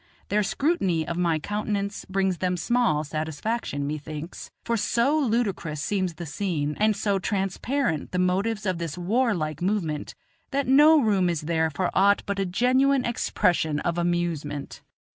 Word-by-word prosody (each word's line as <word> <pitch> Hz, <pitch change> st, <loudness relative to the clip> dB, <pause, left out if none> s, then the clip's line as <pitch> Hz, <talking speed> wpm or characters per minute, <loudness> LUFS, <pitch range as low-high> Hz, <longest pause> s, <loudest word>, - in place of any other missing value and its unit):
Their 210 Hz, +1 st, +2 dB
scrutiny 195 Hz, -, 0 dB
of 170 Hz, -, -2 dB
my 170 Hz, -2 st, +1 dB
countenance 205 Hz, +3 st, -3 dB
brings 190 Hz, -2 st, 0 dB
them 180 Hz, -1 st, 0 dB
small 225 Hz, -4 st, +1 dB
satisfaction, 155 Hz, +2 st, -3 dB
methinks, 155 Hz, +2 st, -6 dB
for 235 Hz, -, 0 dB
so 235 Hz, +6 st, +2 dB
ludicrous 220 Hz, -, 0 dB
seems 185 Hz, +1 st, -1 dB
the 170 Hz, -, -6 dB
scene, 150 Hz, -3 st, -2 dB
and 215 Hz, 0 st, +3 dB
so 200 Hz, -1 st, 0 dB
transparent 195 Hz, -, -1 dB
the 180 Hz, -, -2 dB
motives 195 Hz, +4 st, 0 dB
of 185 Hz, -3 st, -1 dB
this 165 Hz, -2 st, -4 dB
warlike 180 Hz, -, 0 dB
movement, 175 Hz, -6 st, -2 dB, 0.3 s
that 280 Hz, -1 st, 0 dB
no 300 Hz, +4 st, +6 dB
room 200 Hz, -8 st, +2 dB
is 170 Hz, -3 st, -1 dB
there 160 Hz, 0 st, 0 dB
for 175 Hz, +5 st, -2 dB
aught 200 Hz, +1 st, +4 dB
but 200 Hz, 0 st, -2 dB
a 195 Hz, -, 0 dB
genuine 255 Hz, +7 st, +2 dB
expression 170 Hz, -9 st, +1 dB
of 170 Hz, 0 st, -1 dB
amusement. 170 Hz, -5 st, -2 dB
185 Hz, 150 wpm, -25 LUFS, 160-220 Hz, 0.3 s, no